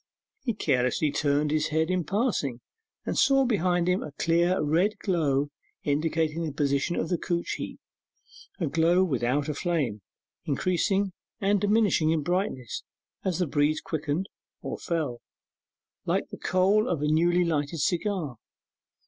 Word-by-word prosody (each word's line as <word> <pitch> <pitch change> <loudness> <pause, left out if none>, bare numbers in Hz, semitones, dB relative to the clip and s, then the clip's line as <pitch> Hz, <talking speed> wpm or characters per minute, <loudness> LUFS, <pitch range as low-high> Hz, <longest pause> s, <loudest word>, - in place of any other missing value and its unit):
He 235 -5 -2
carelessly 135 - +1
turned 145 0 +1
his 155 0 +1
head 160 +2 0
in 180 -3 0
passing, 190 - -1 0.4
and - - -2
saw 270 -1 +4
behind 180 -6 +1
him 180 +1 +2
a 150 - -6
clear 170 +4 +2
red 175 +8 +2
glow 145 -8 +1 0.3
indicating 160 +2 0
the 160 - -2
position 140 +3 0
of 160 - -1
the 175 - 0
couch 170 -2 -2
heap: - - -6 0.8
a 175 - 0
glow 165 +5 +3
without 140 -2 0
a 150 - -1
flame, 140 - -1 0.4
increasing 185 +6 +1 0.3
and 200 0 +2
diminishing 205 -6 +3
in 160 -2 +1
brightness 175 - -2 0.4
as 185 -4 0
the 180 - +1
breeze 150 +1 +1
quickened 160 +4 -2 0.4
or - - -4
fell, 155 -9 -2 0.9
like - - 0
the - - -8
coal 195 +4 +2
of 160 -4 -1
a - - +2
newly 175 +3 +3
lighted 155 -1 -1
cigar. 175 - -1
165 Hz, 145 wpm, -27 LUFS, 145-185 Hz, 0.9 s, saw